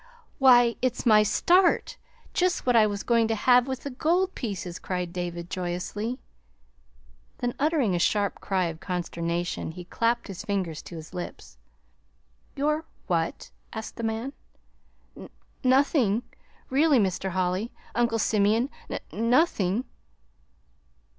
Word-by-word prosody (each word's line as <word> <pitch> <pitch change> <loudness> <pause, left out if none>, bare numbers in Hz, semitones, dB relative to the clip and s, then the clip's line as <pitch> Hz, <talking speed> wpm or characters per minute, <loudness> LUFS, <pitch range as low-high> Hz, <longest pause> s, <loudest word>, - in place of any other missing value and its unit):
"Why, 245 -3 +6
it's 255 -1 -1
my 215 -3 +7
'start' 345 - +3 0.4
just 365 0 +1
what 245 -1 +3
I 220 -2 +6
was 205 -1 -4
going 230 -2 +3
to 225 - 0
have 250 +3 +4
with 260 -1 -4
the 280 - -5
gold 350 +8 +1
pieces," 185 -6 -5
cried 180 -2 -3
David 175 -1 -4
joyously. 185 +7 -3 1.2
Then, 245 -1 -2
uttering 290 - +2
a 175 - +1
sharp 200 +2 +1
cry 190 -2 0
of 165 -1 -4
consternation, 175 -2 -3
he 180 +1 -9
clapped 235 +5 0
his 195 -4 -7
fingers 185 -6 -2
to 170 - -10
his 160 +1 -10
lips. 180 -1 -8 1.0
"Your 300 +2 0 0.2
what?" 165 -3 -2 0.2
asked 220 -1 -6
the - - -4
man. 225 +4 -2 0.8
"N - - -10 0.3
nothing, 255 -4 +3 0.5
really, 290 +1 +4
Mr. 190 -3 0
Holly, 185 +4 -1 0.2
Uncle 235 -1 +1
Simeon, 220 +4 +2 0.2
n - - -3
nothing." 230 - +2
220 Hz, 130 wpm, -26 LUFS, 180-255 Hz, 1.2 s, my